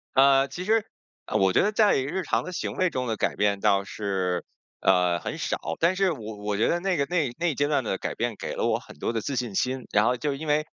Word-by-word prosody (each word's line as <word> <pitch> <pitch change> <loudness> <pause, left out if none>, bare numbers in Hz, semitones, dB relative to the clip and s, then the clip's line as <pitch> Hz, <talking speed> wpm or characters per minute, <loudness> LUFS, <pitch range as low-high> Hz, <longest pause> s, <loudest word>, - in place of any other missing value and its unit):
呃， 135 0 +5
其 140 +7 -6
实， 220 +2 +2 0.4
呃， - - -6
我 95 -1 +3
觉 - - +4
得 210 +2 +1
在 210 -1 +4
日 150 +8 -2
常 145 - 0
的 185 - -6
行 180 - -3
为 185 -1 +2
中 130 -5 -2
的 110 -2 -2
改 - - 0
变 100 -1 +1
倒 100 0 +3
是， 95 -3 -2 0.3
呃， 90 -2 +3
很 - - -5
少。 - - -1 0.2
但 175 +3 +3
是 195 -3 +2
我 110 -6 -8
我 105 0 -2
觉 110 - +2
得 175 - +1
那 190 +1 0
个 140 -3 +1
那 170 -5 +1
一 120 - -8
那 175 - 0
一 160 - +1
阶 145 - +1
段 145 -3 +1
的 100 -4 -2
改 - - -4
变， 120 0 -1
给 - - -5
了 - - -1
我 - - +1
很 - - -14
多 95 - -2
的 115 - -1
自 135 +5 -3
信 120 -4 -2
心， 130 +2 -1
然 105 +1 +4
后 125 - +3
就 145 +3 -2
因 150 +3 -6
为， 150 +1 +2
130 Hz, 295 characters per minute, -26 LUFS, 105-165 Hz, 0.4 s, 呃